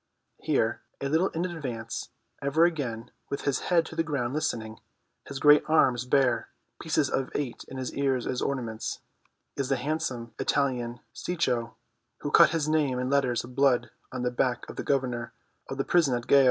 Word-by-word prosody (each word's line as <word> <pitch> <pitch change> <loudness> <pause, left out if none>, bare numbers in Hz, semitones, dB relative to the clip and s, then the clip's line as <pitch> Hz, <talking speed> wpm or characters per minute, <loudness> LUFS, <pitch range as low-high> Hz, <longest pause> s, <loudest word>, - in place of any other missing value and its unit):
Here, - - +1 0.2
a 140 - -2
little 160 +6 +2
in 170 +2 -2
advance, 125 -10 -5 0.3
ever 140 +4 +4
and 175 - +3
again 120 -6 -4 0.2
with 140 - -3
his 140 -2 0
head 170 -2 +4
to - - -9
the - - +2
ground 140 -6 -2
listening, 115 -7 -2 0.5
his 140 - -5
great 150 +2 +6
arms 130 -6 +3
bare, 125 -3 +2 0.3
pieces 155 -3 +1
of 135 0 -1
eight 140 -5 -3
in 130 - -8
his 130 -1 -4
ears 135 -3 0
as 125 - -2
ornaments, 115 -5 -2 0.6
is 135 -2 -2
the 135 - +3
handsome 130 -4 -3
Italian 125 -4 0
Cecco, 125 -10 -1 0.5
who - - -3
cut - - +8
his 155 -2 -1
name 150 -5 +2
in 125 +1 -1
letters 130 -4 +2
of 125 +1 -10
blood 135 -2 +3 0.2
on 130 -1 -4
the 125 - +1
back 125 0 0
of - - -8
the - - -4
governor 125 -4 -1 0.4
of 135 - -4
the 135 - -1
prison 160 -8 +3
at 120 -1 -4
Gao. 140 - +6
135 Hz, 185 wpm, -28 LUFS, 120-150 Hz, 0.6 s, cut